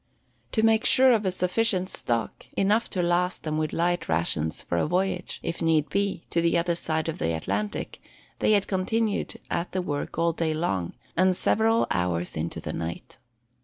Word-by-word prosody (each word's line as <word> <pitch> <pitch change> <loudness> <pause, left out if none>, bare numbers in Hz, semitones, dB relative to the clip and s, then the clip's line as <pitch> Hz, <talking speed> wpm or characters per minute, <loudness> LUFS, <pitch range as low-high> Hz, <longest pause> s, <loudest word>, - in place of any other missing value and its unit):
To 220 - +2
make 225 0 +4
sure 260 0 +6
of 215 -4 +2
a - - +2
sufficient 185 +1 +1
stock, 115 -10 -2
enough 210 +4 +2
to 180 - -1
last 175 +1 +1
them 155 -1 -1
with 155 -1 -1
light 175 +1 0
rations 80 -1 0
for 85 - -2
a - - +1
voyage, 180 +1 -1
if 170 - -4
need 155 -3 +2
be, 200 -1 -1
to 170 - +2
the 170 0 +2
other 170 +1 +1
side 160 -2 -1
of 165 - -3
the 80 0 0
Atlantic, 100 +5 -3 0.4
they - - +3
had 200 -2 +3
continued 210 +3 -1 0.2
at 170 +1 -2
the 185 - 0
work 145 -3 -4
all 165 0 +2
day 160 -1 -1
long, 95 - -1 0.2
and 185 +1 +3
several 225 +1 +3
hours 90 -1 -1
into 80 +2 -3
the - - -5
night. 85 0 -6
170 Hz, 185 wpm, -26 LUFS, 145-190 Hz, 0.4 s, sure